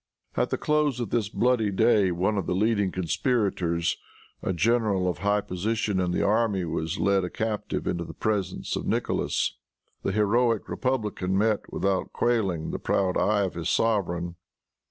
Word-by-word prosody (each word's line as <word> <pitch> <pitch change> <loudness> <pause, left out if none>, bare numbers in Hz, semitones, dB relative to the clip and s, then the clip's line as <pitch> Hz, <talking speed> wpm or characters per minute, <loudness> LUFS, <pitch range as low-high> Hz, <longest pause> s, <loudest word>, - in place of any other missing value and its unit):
At - - +1
the - - -1
close 150 -4 +1
of 120 -4 -3
this 110 -4 0
bloody 115 -1 +2
day, 100 0 +3
one 90 +5 0
of 100 - -2
the 90 - 0
leading 105 -1 +2
conspirators, 90 -3 0 0.4
a - - -1
general 100 -1 +2
of 90 - -2
high 105 0 +2
position 105 +1 -1
in 90 -1 +1
the 90 - 0
army 105 -4 +2
was 80 -1 -2
led 100 -1 +2
a 90 - -2
captive 105 0 -3
into 85 -1 -1
the - - -9
presence 105 -3 -1
of - - -4
Nicholas. - - 0 0.4
The - - -1
heroic 110 +2 +2
republican 105 -7 -1
met, 110 0 +1
without 95 -1 -1
quailing, 95 -9 0
the - - -3
proud 95 -2 +1
eye 105 0 +2
of 95 - -2
his 85 -1 -3
sovereign. 85 -6 0
100 Hz, 165 wpm, -26 LUFS, 90-110 Hz, 0.4 s, day